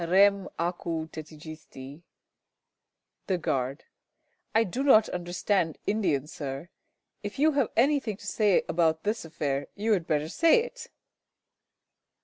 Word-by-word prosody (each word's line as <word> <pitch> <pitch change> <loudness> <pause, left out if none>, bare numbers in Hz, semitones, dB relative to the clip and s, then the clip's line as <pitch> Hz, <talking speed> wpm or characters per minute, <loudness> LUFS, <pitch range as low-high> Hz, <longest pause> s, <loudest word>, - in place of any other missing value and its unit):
Rem 195 +3 +4
acu 170 -2 -2
tetigisti! 155 -2 -10 1.3
The 185 - +1
Guard. 135 -3 -2 0.7
I 225 - +6
do 225 +6 -3
not 245 -6 +6
understand 175 -1 -1
Indian, 190 -10 +1
Sir. 145 +1 -6 0.5
If 205 -1 -6
you 310 +3 +4
have 275 -5 +1
anything 255 -5 +2
to - - -13
say 210 -4 +2
about 160 -1 +1
this 210 -2 -1
affair, 145 -3 -2
you 215 +2 -1
had 175 -5 -1
better 150 0 0
say 330 - +4
it. - - -9
175 Hz, 125 wpm, -28 LUFS, 155-215 Hz, 1.3 s, I